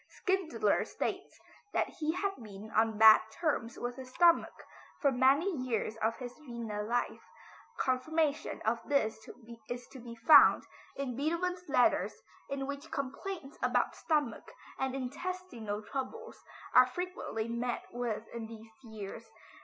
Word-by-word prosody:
Schindler 380 -4 0
states - - -4 0.4
that - - +2
he 310 0 0
had 395 +2 0
been 210 0 -10
on 220 -1 +2
bad 220 0 +9
terms 290 -9 -1
with 245 +1 -4
his 260 -1 -8
stomach 340 +5 +3 0.3
for 280 -4 +3
many 275 +9 +3
years 245 -5 -2
of 225 +1 0
his 250 -1 -7
Vienna 235 -7 -5
life. 235 +3 -1 0.6
Confirmation 295 +4 0
of 230 +2 +2
this 220 -6 +1 0.5
is 245 0 -5
to 265 - -11
be 235 -1 -9
found 230 +7 +7 0.3
in 265 -3 -3
Beethoven's 345 +6 -1
letters - - +2 0.3
in 275 -1 -2
which 280 +3 -6
complaints 280 +3 -5
about - - +1
stomach 300 -6 -1 0.3
and 265 0 -1
intestinal 265 - -4
troubles 285 - -6 0.3
are 255 - +8
frequently 355 - -4
met 235 +1 -2
with 230 -2 -3
in 230 -1 -5
these 225 0 -11
years. 215 -4 -8
255 Hz, 135 wpm, -32 LUFS, 230-315 Hz, 0.6 s, bad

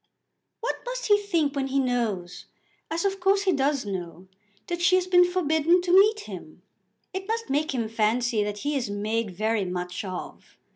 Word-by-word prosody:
"What 470 - -2
must - - -4
he 415 0 +6
think 335 -8 0
when 270 -1 -1
he 270 +1 -1
knows, 230 -9 -2 0.4
as 335 +3 -2
of 390 0 0
course 390 +2 +3
he 380 - +3
does 280 -4 +1
know, 185 -2 -6 0.4
that 345 0 -4
she 355 +1 +5
has 370 -1 +2
been 360 -1 +6
forbidden 335 -1 +2
to 355 - -1
meet 420 +3 +6
him? - - -10 0.5
It 380 +1 -5
must 455 -6 -2
make 300 +3 +1
him 230 -3 -1
fancy 225 0 +1
that 205 0 -4
he 295 0 0
is 250 -6 -1
made 215 +2 -1
very 215 +3 -1
much 180 0 -4
of. 185 -2 -8
280 Hz, 185 wpm, -26 LUFS, -, 0.5 s, he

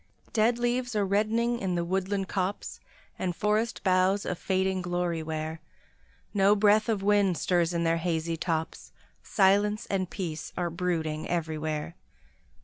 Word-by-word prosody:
Dead 230 +1 +3
leaves 245 0 -1
are 205 -1 +2
reddening 225 +4 +1
in 185 -2 -1
the 170 0 -1
woodland 190 +2 -1
copse, 190 +1 -3 0.4
And 180 -2 -1
forest 210 +4 0
boughs 185 +1 +2
a - - -1
fading 190 +1 0
glory 175 -2 -1
wear; 160 0 -4 0.7
No 200 0 +4
breath 210 +2 +4
of 205 -3 0
wind 200 -3 +3
stirs 170 +3 +1
in 170 -1 -1
their 165 0 +2
hazy 165 -1 -1
tops, 160 -1 -3 0.3
Silence 205 +2 +2
and 185 -2 0
peace 165 -5 -5
are 175 -1 -1
brooding 160 -3 -2
everywhere. 155 -1 -2
185 Hz, 145 wpm, -28 LUFS, 170-205 Hz, 0.7 s, No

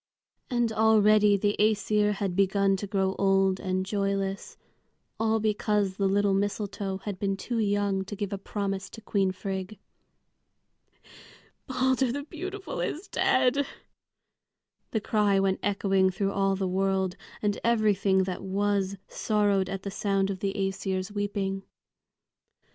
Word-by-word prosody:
And 240 -2 +1
already 215 -2 +5
the 205 +1 +1
Æsir 210 0 +2
had 195 -3 -2
begun 195 0 +3
to 205 - -5
grow 190 -1 0
old 195 -1 +3
and 185 0 -1
joyless, 195 -1 -2 0.6
all 225 0 +2
because 210 -2 0
the 195 - +2
little 200 0 +2
mistletoe 200 -1 -2
had 195 -1 -6
been 195 -2 -1
too 235 +4 -3
young 200 -2 +1
to 205 - -6
give 205 0 -4
a 200 - -3
promise 195 -1 -3
to - - -10
Queen 195 -3 +1
Frigg. 190 +2 -5 1.9
"Balder 260 -1 +1
the 285 +3 -3
beautiful 380 - -6
is 360 +6 -3
dead!" 260 -1 +2 1.2
the 220 - -1
cry 205 -2 +2
went 195 -1 +1
echoing 195 -1 +2
through 195 +1 -1
all 195 -1 +1
the 190 -1 -1
world, 190 0 0 0.3
and 205 -1 0
everything 205 -4 +3
that 185 -1 -4
was 200 0 0
sorrowed 205 -3 +1
at 195 -1 -4
the 200 - -4
sound 195 -1 0
of 190 - -5
the 195 0 -1
Æsir's 195 -1 -2
weeping. 200 -1 -2
200 Hz, 135 wpm, -27 LUFS, 195-210 Hz, 1.9 s, already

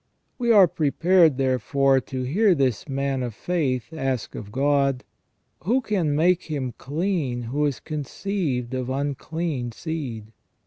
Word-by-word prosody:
We 240 -1 +2
are 200 -5 +8
prepared, 165 0 +3
therefore, 135 +1 +2
to 130 0 -5
hear 185 - +3
this 135 -1 0
man 135 -1 -1
of 120 -4 -4
faith 150 -5 -1
ask 135 -6 -2
of 105 -1 -8
God: 140 0 +1 0.3
" - - -47
Who 240 +7 +3
can 190 - 0
make 175 +4 +3
him 135 -6 -3
clean 145 -5 -2
who 145 +6 0
is 140 - -3
conceived 150 -4 -3
of 130 -1 -2
unclean 140 -1 -3
seed 125 -9 -5
140 Hz, 140 wpm, -24 LUFS, 130-165 Hz, 0.3 s, are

